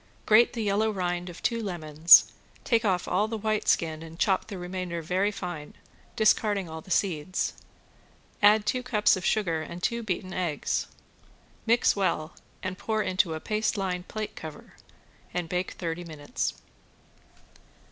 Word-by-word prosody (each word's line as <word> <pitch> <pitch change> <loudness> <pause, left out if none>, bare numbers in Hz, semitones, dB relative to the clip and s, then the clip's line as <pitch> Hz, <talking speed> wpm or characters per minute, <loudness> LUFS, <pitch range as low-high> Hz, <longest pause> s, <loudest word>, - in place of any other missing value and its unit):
Grate 220 +2 +5
the 230 -2 -2
yellow 210 +2 +1
rind 180 -3 -2
of 175 - -11
two 230 -1 0
lemons, 165 -5 +6 0.3
take 230 -1 +2
off 185 -4 0
all 200 +4 +1
the 225 0 -3
white 215 0 -1
skin 160 -1 +1
and 165 0 -10
chop 190 0 +1
the 205 -3 -6
remainder 180 -1 -4
very 185 +5 +1
fine, 175 -7 -6 0.4
discarding 210 -3 +2
all 160 0 -7
the 185 - -17
seeds. 180 -2 0 0.9
Add 210 +1 +6
two 250 +5 0
cups 230 -5 +3
of 185 - -6
sugar 170 -7 +1
and 170 +2 -8
two 235 0 0
beaten 185 -3 -3
eggs. 175 -5 -1 0.8
Mix 235 +1 +4
well 170 -5 -1 0.3
and 185 -1 -4
pour 220 -1 -1
into 185 -3 +1
a - - -4
paste 215 +4 -1
lined 180 -2 -2
plate 215 -1 -5
cover, 155 -2 -10 0.6
and 175 -2 -1
bake 180 +2 -2
thirty 170 0 -4
minutes. 155 -4 -4
185 Hz, 155 wpm, -27 LUFS, 170-215 Hz, 0.9 s, lemons